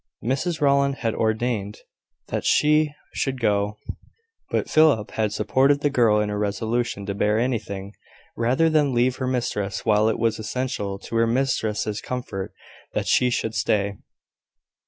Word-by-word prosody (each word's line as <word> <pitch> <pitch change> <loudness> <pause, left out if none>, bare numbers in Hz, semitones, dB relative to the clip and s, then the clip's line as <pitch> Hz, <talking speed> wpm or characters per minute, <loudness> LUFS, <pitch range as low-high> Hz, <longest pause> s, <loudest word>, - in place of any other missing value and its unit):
Mrs 150 +7 -1
Rowland 140 -1 +3
had 115 - +2
ordained 110 -2 -1 0.5
that - - -2
she 150 0 +3 0.2
should 135 -2 -2
go; 105 -2 0 0.7
but - - -1
Philip 150 -9 +3
had 110 -2 -1
supported 130 +8 +2
the 145 - +1
girl 115 -5 +3
in 105 0 0
her 105 0 -2
resolution 105 +1 -2
to 100 - -3
bear 105 +2 +1
anything, 110 -5 -2 0.4
rather 125 +8 +2
than 150 -5 +2
leave 125 +1 +2
her 130 - -2
mistress 105 -5 -2
while 110 0 +3
it 110 - -1
was 115 -1 0
essential 110 -3 -3
to 115 - -8
her 115 0 +3
mistress's 110 -4 -1
comfort 120 -7 -5 0.4
that - - -1
she 125 - +3
should 115 -2 -1
stay. 100 -2 0
115 Hz, 150 wpm, -23 LUFS, 105-130 Hz, 0.7 s, Rowland